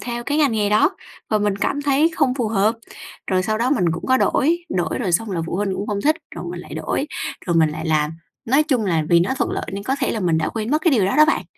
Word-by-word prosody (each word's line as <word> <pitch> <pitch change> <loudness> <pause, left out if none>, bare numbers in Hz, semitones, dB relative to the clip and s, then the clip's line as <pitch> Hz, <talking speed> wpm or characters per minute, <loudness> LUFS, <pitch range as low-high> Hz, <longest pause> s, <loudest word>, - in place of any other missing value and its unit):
theo 240 -1 -4
cái 290 +1 0
ngành 285 -6 +3
nghề 210 -2 0
đó. 215 - +4 0.4
Và 215 - +3
mình 205 -1 0
cảm 285 +8 -1
thấy 290 +3 +3
không 260 -4 +2
phù 240 -5 -1
hợp, 215 +1 +2 0.5
rồi 185 -1 +1
sau 215 +4 -1
đó 250 +3 +1
mình 210 -11 +2
cũng 160 - -5
có 260 - +4
đổi, 335 +6 +1
đổi 175 +1 -1
rồi 190 -8 -2
xong 220 +4 +1
là 170 -3 -2
phụ - - -4
huynh 195 -2 -1
cũng 200 +2 -4
hông 205 -1 -1
thích, 310 +2 +3 0.2
rồi - - -6
mình - - -6
lại - - -10
đổi - - -2 0.4
rồi 170 -1 +1
mình 160 -2 +4
lại 160 +2 -5
làm. 155 -1 +1 0.3
Nói 270 +6 +3
chung 260 -8 0
là 165 -5 +1
vì 170 -1 +5
nó 200 +10 0
thuận - - 0
lợi - - -3
nên 200 +1 -4
có 265 +5 -1
thể 265 - +1
là 220 - -3
mình 170 -3 +1
đã 160 - 0
quên 220 +2 -4
mất 305 - +3
cái 340 - +4
điều 220 -8 +3
đó 195 - 0
đó 305 - +8
bạn. 310 - 0
215 Hz, 290 wpm, -21 LUFS, 185-270 Hz, 0.5 s, đó